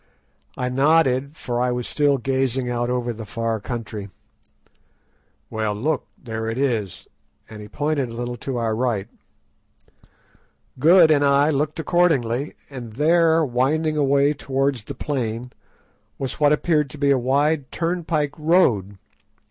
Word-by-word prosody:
I 125 - -1
nodded, 140 +1 +2
for 120 -1 -2
I 125 0 +1
was 125 -1 -3
still 145 -2 +2
gazing 130 0 -1
out 120 0 -1
over 125 -1 -1
the 110 0 -8
far 115 +1 -3
country. 110 -3 -6 1.4
"Well, 110 -1 -1
look; 140 +6 -1
there 110 -2 -5
it 115 - -4
is!" 115 -9 -2 0.4
and 110 -1 -10
he 105 - -9
pointed 145 +1 -1
a - - -8
little 120 +1 -4
to 130 +2 -4
our 115 -2 0
right. 110 -4 -1 1.7
Good 165 +2 +6
and 145 -2 +4
I 140 +2 +4
looked 150 +2 -1
accordingly, 145 -6 +1
and 125 -5 -9
there, 160 +4 +3
winding 150 +5 0
away 140 0 +3
towards 135 -4 -1
the - - -7
plain, 125 -4 -3 0.7
was 135 -2 -5
what 145 -1 +4
appeared 150 -1 +1
to 150 - -9
be 140 -1 +2
a 135 - +3
wide 140 +3 +1
turnpike 165 -4 -1
road. 125 - +2
135 Hz, 140 wpm, -22 LUFS, 120-150 Hz, 1.7 s, Good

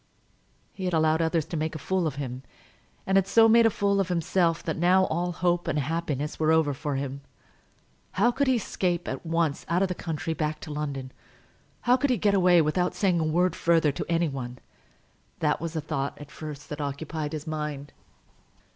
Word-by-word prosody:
He 190 - -5
had 180 -2 0
allowed 160 0 +3
others 160 -1 +1
to 170 - -6
make 155 0 -2
a - - -2
fool 185 +2 0
of 150 - -4
him, 130 -2 -5 0.6
and 195 0 +3
had 195 -1 +3
so 225 +2 +6
made 230 0 +6
a - - +4
fool 200 -1 +1
of 195 - +1
himself 170 -1 +1
that 160 - -2
now 180 +3 +4
all 175 +2 -1
hope 175 0 0
and 155 -3 0
happiness 150 -1 -2
were 155 0 +3
over 160 -3 +3
for 145 +1 -3
him. 140 0 -4 0.9
How 220 +7 +3
could 280 +3 0
he 260 - +4
escape 180 -5 -1
at - - -4
once 165 -3 0
out 175 +3 +2
of 190 - 0
the - - 0
country, 165 -1 -3
back 155 0 -2
to 155 - -6
London? 140 -3 -4 0.7
How 250 +1 +4
could 285 +2 0
he 250 - +2
get 205 +1 +2
away 180 -3 +5
without 180 +4 0
saying 185 -4 +2
a - - +1
word 170 +3 +1
further 165 -3 +3
to 140 - -5
any 170 0 +2
one? 125 -3 -5 0.8
That 150 -1 0
was 165 -1 -4
the 160 - -2
thought 140 -2 -3
that - - -14
at 145 - -16
first 150 -3 -8
occupied 150 +2 -4
his 150 -1 -5
mind. 150 -2 -4
165 Hz, 205 wpm, -27 LUFS, 150-180 Hz, 0.9 s, so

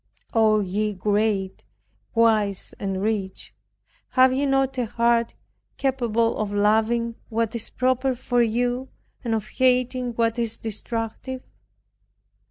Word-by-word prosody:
O 215 -2 +4
ye 205 +2 -1
great, 200 0 0 0.5
wise 215 -4 +2
and 195 -1 -2
rich, 205 -3 -2 0.6
have 255 0 +6
ye 280 +2 +1
not 270 -1 +2
a 240 - 0
heart 235 +1 +1 0.4
capable 235 -4 +1
of 210 -1 -2
loving 220 +3 +2 0.2
what 225 -1 -1
is 235 -2 -3
proper 255 +1 +1
for 245 0 +1
you 245 +3 0 0.3
and 230 -2 0
of 215 -1 -3
hating 255 -1 +1
what 230 0 0
is 230 -1 -1
destructive? 225 +4 -4
230 Hz, 120 wpm, -24 LUFS, 215-250 Hz, 0.6 s, have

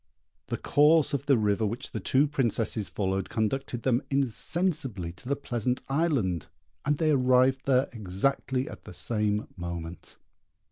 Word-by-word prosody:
The - - -2
course 150 +1 +4
of 140 0 -2
the 135 -3 +5
river 105 0 +1
which 110 +3 -3
the 110 - -3
two 130 +8 +3
Princesses 115 -6 0
followed 95 -1 -2
conducted 120 +2 -2
them 125 -1 +2
insensibly 135 - 0
to 90 +9 -11
the 140 - +2
Pleasant 125 -2 -2
Island, 135 - 0 0.4
and 150 0 +1
they 155 0 +2
arrived 130 0 +3
there 130 0 +4
exactly 125 +6 -1
at - - -10
the - - -10
same 105 -2 -1
moment. 85 -2 -7
125 Hz, 145 wpm, -28 LUFS, 105-140 Hz, 0.4 s, the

